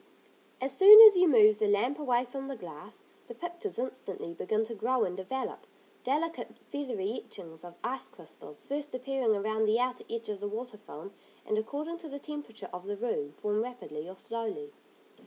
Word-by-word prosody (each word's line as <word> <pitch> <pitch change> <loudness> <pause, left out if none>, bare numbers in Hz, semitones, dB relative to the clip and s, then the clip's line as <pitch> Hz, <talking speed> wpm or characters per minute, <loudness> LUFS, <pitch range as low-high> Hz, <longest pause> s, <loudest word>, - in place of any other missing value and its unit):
As 265 +1 -1
soon 410 +5 +11
as 430 -3 +11
you 365 0 +5
move 215 -7 +6
the 215 - +2
lamp 235 +8 +1
away 250 -4 +1
from 270 +2 -7
the 275 - -5
glass, 175 0 -11 0.2
the 235 - -9
pictures 350 - -6
instantly 195 -8 -5
begin 215 +6 -1
to 225 +1 -6
grow 240 +4 0
and 180 - -3
develop. 190 +8 -5 0.4
Delicate, 315 +6 -2
feathery 240 -7 -4
etchings 160 -1 -10
of 175 -1 -11
ice 250 +3 -3
crystals 155 -3 -14
first 290 0 -5
appearing 255 -3 0
around 220 +2 0
the 215 +1 +3
outer 250 0 -1
edge 230 -1 -5
of 205 -2 -4
the 205 - -3
water 225 0 -6
film, 195 -2 -11 0.3
and 215 - -1
according 295 +10 -4
to 320 - -9
the 280 - -6
temperature 290 -6 -8
of 180 +2 -8
the 205 0 -3
room, 170 -11 -3
form 210 +6 -1
rapidly 180 -10 -7
or 190 - -10
slowly. 230 - -5
230 Hz, 185 wpm, -30 LUFS, 205-275 Hz, 0.4 s, soon